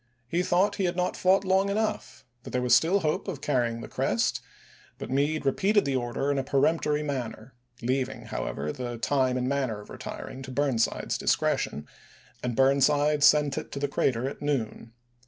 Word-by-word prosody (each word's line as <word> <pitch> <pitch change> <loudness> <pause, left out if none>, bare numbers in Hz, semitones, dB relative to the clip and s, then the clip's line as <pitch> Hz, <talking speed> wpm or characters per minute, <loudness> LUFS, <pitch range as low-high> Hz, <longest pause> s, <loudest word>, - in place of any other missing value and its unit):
He 170 +8 0
thought 180 +2 +2
he 195 - 0
had 175 0 -1
not 180 0 -1
fought 190 +2 +3
long 190 +1 +2
enough; 215 -8 -2 0.2
that - - -9
there 125 - -1
was 125 -2 +3
still 165 +11 +4
hope 155 -2 -1
of 140 - -4
carrying 120 -5 0
the - - -7
crest; 115 -4 0 0.6
but - - -7
Meade 145 +3 0
repeated 200 +9 +2
the 140 -1 0
order 130 +3 -1
in 140 - 0
a - - -1
peremptory 150 +2 +1
manner 125 -4 -5
— 120 0 -28
leaving, 130 +1 -1
however, 75 +2 -4
the 120 +2 -5
time 130 +1 +1
and 125 0 -1
manner 130 -6 -1
of 105 - -13
retir - - -7
ing 130 - -8
to 130 0 -8
Burnside's 130 -4 0
discretion 75 +1 0 0.3
— - - -28
and 125 -2 -2
Burnside 145 +3 +3
sent 150 -2 +5
it - - -10
to - - -5
the 145 - 0
crater 130 -2 0
at 140 - -7
noon. 120 -5 -3
135 Hz, 195 wpm, -27 LUFS, 125-150 Hz, 0.6 s, sent